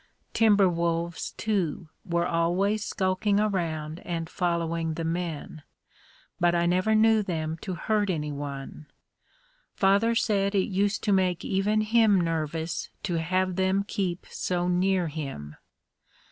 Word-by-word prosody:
Timber 205 Hz, -3 st, +5 dB
wolves, 170 Hz, -1 st, -2 dB
too, 180 Hz, -7 st, -2 dB
were 170 Hz, -2 st, 0 dB
always 185 Hz, +6 st, +1 dB
skulking 195 Hz, +2 st, 0 dB
around 165 Hz, -6 st, -1 dB
and 165 Hz, -2 st, -4 dB
following 165 Hz, -2 st, -1 dB
the 165 Hz, -, -3 dB
men, 165 Hz, -2 st, -4 dB, 0.8 s
but 175 Hz, 0 st, +3 dB
I 170 Hz, 0 st, +2 dB
never 185 Hz, +5 st, +2 dB
knew 220 Hz, 0 st, +5 dB
them 160 Hz, -5 st, -3 dB
to 185 Hz, -3 st, -4 dB
hurt 210 Hz, +3 st, 0 dB
anyone. 145 Hz, -2 st, -4 dB, 0.9 s
Father 200 Hz, +4 st, +3 dB
said 200 Hz, -3 st, +1 dB
it 190 Hz, -, +1 dB
used 200 Hz, +2 st, 0 dB
to 210 Hz, -, +1 dB
make 185 Hz, -2 st, +1 dB
even 205 Hz, +2 st, +1 dB
him 215 Hz, -2 st, +4 dB
nervous 165 Hz, -1 st, -2 dB
to 175 Hz, -5 st, -1 dB
have 185 Hz, +2 st, 0 dB
them 190 Hz, +1 st, +2 dB
keep 180 Hz, -4 st, -2 dB
so 175 Hz, -1 st, -1 dB
near 180 Hz, 0 st, +2 dB
him. 135 Hz, -, -6 dB
180 Hz, 130 wpm, -27 LUFS, 165-200 Hz, 0.9 s, Timber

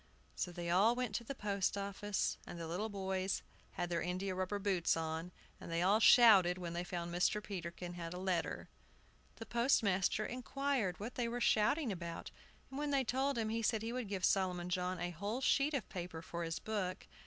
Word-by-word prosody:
So 180 Hz, -, -2 dB
they 175 Hz, 0 st, -3 dB
all 205 Hz, +7 st, +5 dB
went 250 Hz, -4 st, -2 dB
to 235 Hz, -, -6 dB
the 275 Hz, +4 st, -6 dB
post 200 Hz, -3 st, 0 dB
office, 200 Hz, 0 st, -2 dB
and 170 Hz, -, -7 dB
the 165 Hz, -, -4 dB
little 190 Hz, +7 st, -2 dB
boys 190 Hz, -1 st, -2 dB, 0.3 s
had 175 Hz, -, -3 dB
their 170 Hz, -, 0 dB
india 185 Hz, +2 st, -2 dB
rubber 185 Hz, +2 st, -1 dB
boots 190 Hz, -5 st, +1 dB
on, 160 Hz, +2 st, -3 dB, 0.3 s
and -, -, -8 dB
they 165 Hz, +1 st, +1 dB
all 200 Hz, +4 st, +4 dB
shouted 205 Hz, -7 st, +7 dB
when 175 Hz, -2 st, -5 dB
they 175 Hz, +1 st, -2 dB
found 175 Hz, -1 st, -4 dB
Mr. 180 Hz, +4 st, +2 dB
Peterkin 175 Hz, -2 st, -5 dB
had 170 Hz, -1 st, -6 dB
a 180 Hz, -, -5 dB
letter. 185 Hz, -1 st, -1 dB, 0.7 s
The 225 Hz, -, -8 dB
postmaster 215 Hz, -5 st, +2 dB
inquired 255 Hz, -5 st, -1 dB
what 225 Hz, +5 st, -5 dB
they 245 Hz, -2 st, -1 dB
were 240 Hz, +1 st, -3 dB
shouting 240 Hz, +3 st, +3 dB
about; 170 Hz, -3 st, -6 dB, 0.4 s
and 270 Hz, -, -5 dB
when 295 Hz, 0 st, -1 dB
they 275 Hz, -2 st, +2 dB
told 265 Hz, +2 st, 0 dB
him, 220 Hz, -1 st, 0 dB
he 225 Hz, +1 st, -1 dB
said 220 Hz, -1 st, +1 dB
he 230 Hz, +1 st, -3 dB
would 250 Hz, -3 st, -3 dB
give 190 Hz, -3 st, 0 dB
Solomon 180 Hz, -2 st, +1 dB
John 180 Hz, 0 st, -1 dB
a 175 Hz, +1 st, -2 dB
whole 205 Hz, +8 st, -3 dB
sheet 280 Hz, +2 st, +2 dB
of 260 Hz, -, -2 dB
paper 175 Hz, -3 st, -6 dB
for 170 Hz, +1 st, -4 dB
his 165 Hz, 0 st, -2 dB
book. 200 Hz, -4 st, -3 dB
195 Hz, 200 wpm, -36 LUFS, 175-230 Hz, 0.7 s, shouted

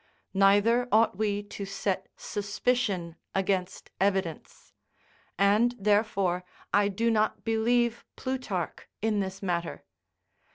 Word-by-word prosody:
Neither 205 Hz, +5 st, +4 dB
ought 220 Hz, -2 st, +4 dB
we 205 Hz, -1 st, 0 dB
to 205 Hz, 0 st, -7 dB
set 195 Hz, -1 st, -2 dB
suspicion 200 Hz, -4 st, -1 dB, 0.2 s
against 190 Hz, -1 st, -1 dB
evidence; 190 Hz, -4 st, -2 dB, 0.6 s
and 210 Hz, +6 st, +3 dB
therefore 200 Hz, -3 st, +1 dB, 0.3 s
I 205 Hz, 0 st, +4 dB
do 230 Hz, +4 st, +1 dB
not 215 Hz, -1 st, +1 dB
believe 235 Hz, +1 st, +1 dB
Plutarch 255 Hz, -10 st, -3 dB, 0.2 s
in 220 Hz, -2 st, +2 dB
this 190 Hz, 0 st, -4 dB
matter. 170 Hz, -2 st, -2 dB
205 Hz, 100 wpm, -28 LUFS, 190-225 Hz, 0.6 s, Neither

